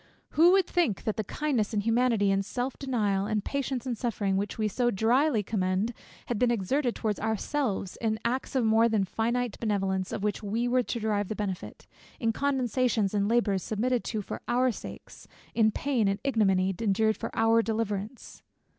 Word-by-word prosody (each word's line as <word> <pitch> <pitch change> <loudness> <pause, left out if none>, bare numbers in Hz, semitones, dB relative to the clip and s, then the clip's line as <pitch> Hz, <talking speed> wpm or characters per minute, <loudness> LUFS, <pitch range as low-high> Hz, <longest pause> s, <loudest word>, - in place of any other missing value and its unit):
Who 340 +4 +5
would 385 -2 +4
think 335 - 0
that 215 - -1
the 215 - -2
kindness 240 -4 -1
and 205 - 0
humanity, 230 -3 +2
and 195 0 +1
self 245 +6 -3
denial, 210 -8 0
and 215 -2 -1
patience 270 -3 -2
in 255 - -1
suffering, 215 -4 -1
which 200 +1 -2
we 215 -1 +1
so 240 +4 +1
drily 235 +3 +2
commend, 190 +2 -1 0.3
had 235 -4 -2
been 250 - +3
exerted 240 +4 0
towards 215 -3 -2
ourselves, 220 -2 -2
in 220 -1 0
acts 255 +3 -2
of 255 -3 +2
more 225 +1 +4
than 215 -3 +2
finite 235 +4 -1
benevolence 195 -4 -1
of 200 - -4
which 210 -1 -1
we 225 +4 -1
were 250 +1 +3
to 240 0 -3
derive 210 -2 0
the 215 - -4
benefit, 195 -4 -5 0.3
in 225 -1 +1
condescensions 250 -6 +1
and 200 -1 +1
labours 220 -5 +2
submitted 240 +5 -1
to 215 -3 -3
for - - -6
our 250 +1 +2
sakes, - - -10 0.3
in 220 -2 +4
pain 245 -1 0
and 195 0 +1
ignominy, 195 -8 +2
endured 220 0 +2
for - - -5
our 225 0 +4
deliverance? 220 +1 -4
225 Hz, 180 wpm, -28 LUFS, 205-245 Hz, 0.3 s, Who